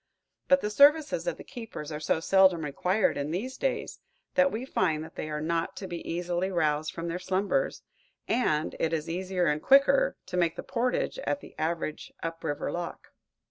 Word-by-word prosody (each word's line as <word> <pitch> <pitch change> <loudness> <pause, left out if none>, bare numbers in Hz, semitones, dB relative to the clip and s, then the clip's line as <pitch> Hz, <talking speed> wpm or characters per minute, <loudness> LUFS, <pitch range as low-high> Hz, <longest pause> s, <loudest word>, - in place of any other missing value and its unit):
But 275 0 +5
the 210 - -2
services 300 - +5
of - - -1
the - - -10
keepers 225 - -8
are 150 - -4
so 155 +1 +1
seldom 185 -2 +4
required 180 +8 +1
in 145 +1 -2
these 225 +11 -3
days - - -2 0.3
that 275 0 +4
we 230 +4 -3
find 160 -10 0
they 155 - -5
are 150 0 -3
not 165 +2 -1
to 195 - -5
be 175 -2 -5
easily 175 +2 -1
roused 155 -4 0
from 170 0 -5
their 170 +1 -3
slumbers, 195 - 0 0.4
and 155 -11 +1
it 165 0 0
is 155 -1 -1
easier 180 +1 -1
and 150 -1 +1
quicker 275 - +5
to 185 -1 -4
make 170 -1 +2
the - - -6
portage 250 - -1
at 285 - -1
the - - -13
average 160 -1 -2
up 165 0 -4
river 145 0 -2
lock. 175 0 -5
180 Hz, 185 wpm, -28 LUFS, 160-230 Hz, 0.4 s, But